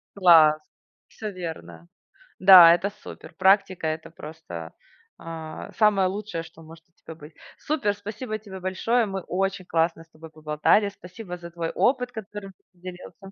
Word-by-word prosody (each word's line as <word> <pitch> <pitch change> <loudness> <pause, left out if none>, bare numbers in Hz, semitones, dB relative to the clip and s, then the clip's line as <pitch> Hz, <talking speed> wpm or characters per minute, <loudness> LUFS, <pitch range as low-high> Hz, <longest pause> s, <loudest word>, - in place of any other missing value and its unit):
Класс, 160 -5 +6 0.5
всё 215 - -7
верно. 85 - -9 0.5
Да, 180 -3 +9
это 180 +4 -1
супер. 210 +1 -13
Практика- 190 -3 +2
это 160 +1 -5
просто, 150 - -10 0.4
а, 160 -1 -8
самое 205 -3 +3
лучшее, 195 -4 -5
что 165 0 -16
может 165 +1 -15
у - - -40
тебя 160 - -12
быть. 150 0 -14 0.2
Супер! 265 -10 -1
Спасибо 215 +2 -6
тебе 195 -3 -11
большое. 220 +6 0
Мы 195 -2 -5
очень 195 +1 -3
классно 165 0 -1
с 165 - -29
тобой 160 +1 -14
поболтали. 155 +6 +1
Спасибо 180 -1 -10
за 170 0 -11
твой 165 -1 -4
опыт, 250 -1 0
которым 210 -3 -9
ты - - -34
поделился. 180 +1 -11
180 Hz, 155 wpm, -24 LUFS, 160-200 Hz, 0.5 s, Да